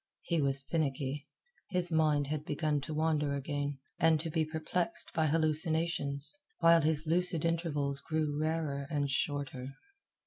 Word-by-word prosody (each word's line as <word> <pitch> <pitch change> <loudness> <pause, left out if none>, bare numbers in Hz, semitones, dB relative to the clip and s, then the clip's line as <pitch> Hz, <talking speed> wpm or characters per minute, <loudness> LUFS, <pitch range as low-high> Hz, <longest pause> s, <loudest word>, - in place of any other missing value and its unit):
He 170 -3 0
was 135 -1 0
finicky. 140 -2 -2 0.4
His 180 -2 -2
mind 155 -3 +2
had 150 +1 -3
begun 150 -1 -1
to 155 - -6
wander 150 -2 0
again, 145 0 -3 0.2
and 160 -1 +4
to 160 +1 -4
be 160 +1 +1
perplexed 160 +3 0
by 160 -1 +1
hallucinations, 155 - +2 0.2
while 165 0 +5
his 155 0 +3
lucid 170 0 +2
intervals 150 -4 0
grew 155 0 -2
rarer 155 -2 -2
and 145 -3 -1
shorter. 140 -2 -3
155 Hz, 140 wpm, -31 LUFS, 145-160 Hz, 0.4 s, while